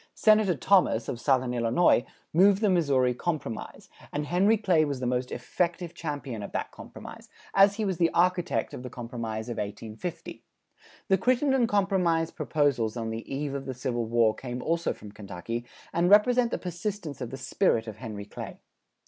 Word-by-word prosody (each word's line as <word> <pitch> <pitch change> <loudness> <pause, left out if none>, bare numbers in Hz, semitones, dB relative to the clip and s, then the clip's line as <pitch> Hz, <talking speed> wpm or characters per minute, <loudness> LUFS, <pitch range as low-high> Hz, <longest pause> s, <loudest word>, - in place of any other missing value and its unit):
Senator 215 -4 +4
Thomas, 150 - +3
of 120 - -4
southern 130 -2 +1
Illinois, 120 +3 +3 0.3
moved 195 +4 +5
the 210 -3 +3
Missouri 140 -8 +3
Compromise, 145 -4 -4 0.2
and 150 0 -2
Henry 195 +8 +3
Clay 180 -7 +3
was 140 -3 -2
the 125 - -3
most 125 +1 -1
effective 170 +7 -2
champion 145 -9 -5
of 100 - -7
that - - -3
compromise, - - -11 0.2
as 195 +1 +6
he 215 0 -1
was 190 -4 -2
the 170 -1 +4
architect 175 -8 +1
of - - -6
the 125 - -7
Compromise 115 -2 -5
of 120 - -5
1850. 110 - -6 0.6
The 190 -1 +3
Crittenden 255 +1 +2
compromise 185 -6 +1
proposals 130 -7 0
on 115 -1 -3
the 115 +3 -6
eve 140 +1 -2
of 135 -1 -5
the 130 - -4
Civil 120 -2 -2
War 115 -1 +3
came 125 0 -6
also 165 +1 0
from 105 - -10
Kentucky 105 +3 -6 0.3
and 170 +1 +2
represent 240 +4 +5
the - - -2
persistence 180 -3 -5
of 125 - -4
the 135 - -6
spirit 125 - +1
of 110 -2 -8
Henry 110 -4 -7
Clay. - - -8
145 Hz, 175 wpm, -27 LUFS, 120-180 Hz, 0.6 s, as